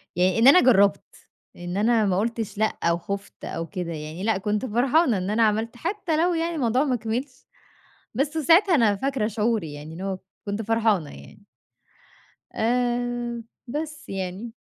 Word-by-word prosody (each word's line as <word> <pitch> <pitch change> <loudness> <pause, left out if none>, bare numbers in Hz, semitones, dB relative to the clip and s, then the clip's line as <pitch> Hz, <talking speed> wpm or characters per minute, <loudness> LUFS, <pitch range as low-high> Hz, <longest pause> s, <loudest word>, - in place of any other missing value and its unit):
يعني 185 +4 +2
إن 235 - +6
أنا 290 +7 +8
جرّبت 200 -6 +2 0.3
إن 175 +1 -5
أنا 220 +1 +3
ما 190 -2 +1
قُلتش 225 -1 -3
لأ 220 0 0
أو 170 0 +2
خفت 200 +3 -7
أو 165 0 -4
كده 180 -4 -5
يعني، 155 +4 -7
لأ، 220 -3 +1
كنت 210 +5 -1
فرحانة 250 - +2
إن 185 +2 -3
أنا 225 +2 +2
عملت 220 +3 0
حتى 340 - -2
لو 350 +2 +2
يعني 335 0 -1
الموضوع 255 -2 +1
ما 255 -3 +1
كمِلش، 245 +4 -5 0.7
بس 290 +6 -1
ساعتها 335 +5 +5
أنا 220 -7 +3
فاكرة 265 -2 -1
شعوري 215 -7 -1
يعني 150 +2 -9
إن 170 - -9
هو 190 -1 -3 0.3
كنت 205 +2 -2
فرحانة 220 -7 +1
يعني. 70 0 -14 1.1
آآ، 240 0 -1 0.3
بس 305 +1 -5
يعني. 195 +4 -5
225 Hz, 165 wpm, -24 LUFS, 195-255 Hz, 1.1 s, أنا